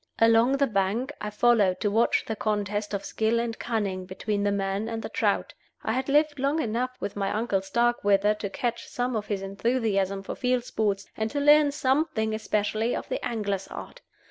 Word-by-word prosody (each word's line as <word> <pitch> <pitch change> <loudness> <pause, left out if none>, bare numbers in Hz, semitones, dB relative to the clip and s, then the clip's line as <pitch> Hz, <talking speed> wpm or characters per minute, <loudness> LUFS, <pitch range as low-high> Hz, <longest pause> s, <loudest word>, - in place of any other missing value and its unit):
Along 230 +3 +5
the 280 - +3
bank 220 +5 -1
I 210 - -3
followed 210 -4 +3
to 205 - +1
watch 225 +3 +2
the 220 - -3
contest 205 -1 -1
of 200 - -4
skill 220 +1 +1
and 230 -1 -3
cunning 200 -6 -2
between 200 +2 -2
the 205 0 +1
man 200 +2 -1
and 225 -1 -4
the - - -4
trout. - - 0 0.3
I - - -1
had 260 +2 -2
lived 295 0 +3
long 280 +4 +1
enough 240 -1 -1
with 205 - -4
my 195 -1 -1
uncle 215 -3 0
Starkweather 205 -1 +2
to 210 -1 -5
catch 235 +3 -3
some 245 0 -2
of 210 -1 -3
his 200 -2 -2
enthusiasm 195 -2 0
for - - -5
field 250 -2 0
sports, 205 -5 -1
and 220 0 -1
to 285 - -2
learn 295 0 +6
something, 265 -5 0
especially, 215 +1 0
of - - -5
the - - -3
angler's 200 -4 -2
art. - - -9
220 Hz, 195 wpm, -26 LUFS, 200-245 Hz, 0.3 s, learn